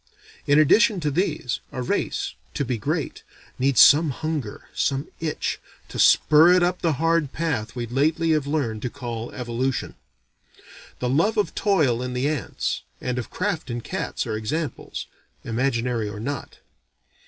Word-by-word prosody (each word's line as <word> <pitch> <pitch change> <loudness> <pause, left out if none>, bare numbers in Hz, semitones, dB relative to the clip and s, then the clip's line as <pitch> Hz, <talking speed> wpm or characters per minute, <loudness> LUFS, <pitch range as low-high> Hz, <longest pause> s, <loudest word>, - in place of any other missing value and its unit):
In 145 - +5
addition 190 +7 +5
to 150 -2 0
these, 140 -6 -1
a 130 - -4
race, - - -1 0.2
to 140 - -1
be 120 -2 -2
great, - - -2 0.4
needs 135 0 +4
some 150 +3 +7
hunger, 150 -5 -4
some 140 +2 0
itch, 160 -2 -2 0.3
to - - -6
spur 155 +3 +6
it 180 -1 +4
up 180 +1 0
the 165 -2 +2
hard 165 -1 +1
path 145 -11 -2
we 120 -1 -3
lately 155 +7 +1
have 150 -3 +1
learned 130 -8 -1
to 125 - -2
call 120 -3 -6
evolution. 125 +1 -2 1.0
The 125 - -2
love 195 - +2
of 210 - +1
toil 150 - +2
in 125 0 -3
the 125 +3 0
ants, 150 -9 -2 0.2
and 125 0 -2
of 120 - -6
craft 185 -9 -2
in 120 0 -3
cats, - - -3
are 110 - -2
examples 145 +9 -4 0.4
(imaginary 120 -2 -1
or 105 0 -7
not). 140 +4 -5
140 Hz, 155 wpm, -24 LUFS, 120-160 Hz, 1.0 s, some